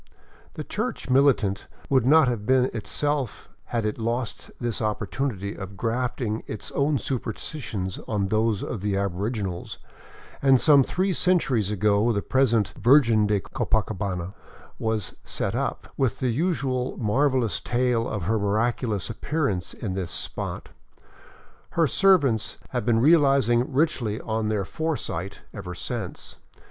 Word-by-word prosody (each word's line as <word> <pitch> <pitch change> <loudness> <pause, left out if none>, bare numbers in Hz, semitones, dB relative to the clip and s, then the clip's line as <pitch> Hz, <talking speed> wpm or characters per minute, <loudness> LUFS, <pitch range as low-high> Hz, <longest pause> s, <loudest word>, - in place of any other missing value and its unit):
The - - -4
church - - -3
militant 130 -8 +3 0.2
would 130 -3 +3
not 155 0 +6
have 120 -4 -1
been 130 +2 +3
itself 135 +2 -2 0.2
had 115 -2 -2
it 105 +2 -2
lost 115 +1 -3
this 120 -2 -2
opportunity 105 -1 -2
of 100 0 -8
grafting 120 0 -1
its 110 - -6
own 140 +1 +1
superstitions 110 -6 -4
on 105 -3 0
those 110 0 +1
of 105 - -4
the 100 -1 0
aboriginals, 100 -1 -3 0.6
and 135 -2 +5
some 145 -1 +6
three 185 +7 0
cen 185 +1 +4
turies 115 - 0
ago 105 +2 +2
the 100 -3 -1
present 120 -6 +2
" - - -11
Virgen 115 -3 +5
de 105 -1 +1
Copacabana 100 -7 -2 0.3
" - - -23
was 110 -5 -2
set - - -2
up, - - -2
with 130 -5 +1
the 130 - 0
usual 135 -3 -1
marvelous 125 - +1
tale 120 -1 +1
of 105 -4 -3
her 110 +5 +1
miraculous 110 +1 0
appearance 115 - -2
in 100 -5 -4
this 95 -3 -3
spot. - - -5 1.0
Her 165 - +3
servants 145 - +3
have 105 - -3
been 115 -1 +4
realizing 135 -3 +4
richly 130 -7 +1
on 110 -1 -2
their 105 -3 0
foresight 100 - -3
ever 90 0 -6
since. 115 0 -6
115 Hz, 140 wpm, -25 LUFS, 105-135 Hz, 1.0 s, not